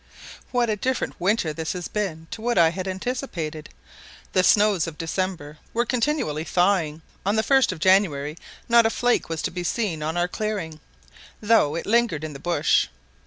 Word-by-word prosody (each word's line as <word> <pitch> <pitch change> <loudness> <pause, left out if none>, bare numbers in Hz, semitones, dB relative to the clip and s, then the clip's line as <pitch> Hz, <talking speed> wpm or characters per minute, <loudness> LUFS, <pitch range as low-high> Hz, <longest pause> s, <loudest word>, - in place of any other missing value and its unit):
WHAT 245 -1 +1
a - - +1
different 255 +5 -2
winter 185 -4 +1
this 160 0 -3
has 180 -2 -5
been 185 -7 -3
to 220 - -6
what 240 +1 0
I 165 -1 +6
had 185 +2 -5
anticipated. 185 - -4 0.6
The 185 - +4
snows 205 -3 +4
of 155 -2 -7
December 165 -3 -3 0.2
were 240 +1 +2
continually 235 - 0
thawing; 170 -3 +1 0.2
on 200 +2 +1
the 220 - +2
1st 265 +1 +4
of 185 - -6
January 155 -5 +2 0.3
not 235 -1 +6
a - - +1
flake 245 -3 +1
was 165 -1 -3
to - - -1
be 180 0 -4
seen 175 -4 -1
on 160 +3 -2
our 175 0 +2
clearing, 190 -6 -4 0.6
though 205 -9 +3
it 170 - -4
lingered 220 -8 +1
in 155 -1 -5
the 140 - -9
bush. 175 +3 +2
185 Hz, 180 wpm, -24 LUFS, 160-220 Hz, 0.6 s, I